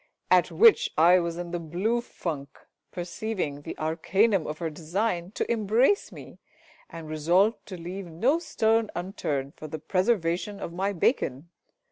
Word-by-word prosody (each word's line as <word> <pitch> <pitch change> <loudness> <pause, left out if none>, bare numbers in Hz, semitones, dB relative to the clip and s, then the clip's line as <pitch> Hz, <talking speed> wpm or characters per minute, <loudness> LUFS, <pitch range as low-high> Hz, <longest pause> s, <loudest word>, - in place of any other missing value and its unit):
At - - +5
which 465 +1 +5
I 175 +3 +6
was 170 -1 -3
in 175 -1 -5
the 175 - -2
blue 185 +9 -1
funk, 145 - -6 0.3
perceiving 175 -4 -4
the - - -7
arcanum 180 +5 +1
of 150 - -4
her 165 -1 -3
design 175 +3 -2
to - - -2
embrace 235 - +2
me, - - -12 0.5
and 165 -1 -9
resolved 175 +8 +2
to 185 - -7
leave 180 +3 -6
no 240 - +1
stone 225 -9 +1
unturned 150 -6 -3
for 155 - -8
the 155 - -5
preservation 185 +2 0
of 170 - -6
my 195 +3 -1
bacon. 165 - 0
175 Hz, 150 wpm, -27 LUFS, 160-215 Hz, 0.5 s, I